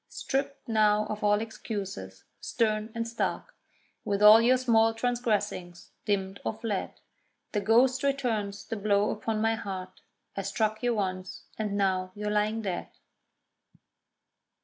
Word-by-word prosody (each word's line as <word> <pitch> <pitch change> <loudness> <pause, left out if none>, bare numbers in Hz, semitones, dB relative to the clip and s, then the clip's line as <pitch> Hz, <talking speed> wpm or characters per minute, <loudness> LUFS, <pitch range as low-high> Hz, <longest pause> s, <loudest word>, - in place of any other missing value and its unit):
Stript 275 +1 -3
now 215 -2 +3
of 210 0 -5
all 205 0 +3
excuses, 195 - -6 0.2
stern 215 -2 -1
and 230 0 -2
stark, 235 - -3 0.5
With 200 0 0
all 215 +2 +10
your 250 +2 +4
small 225 -3 +3
transgressings 225 -7 -2
dimmed 195 -1 -1
or - - -1
fled, 220 -3 -3 0.6
The 205 - 0
ghost 245 +4 +4
returns 235 -8 -1
the 225 - -4
blow 205 0 +2
upon 215 0 -2
my 225 0 +2
heart 190 -4 -6 0.3
I 195 - -2
struck 215 +2 -1
you 245 -1 +1
once—and 195 +1 -4
now 185 -2 0
you're 210 0 -3
lying 210 +2 0
dead. 185 -3 -3
215 Hz, 130 wpm, -28 LUFS, 200-225 Hz, 0.6 s, all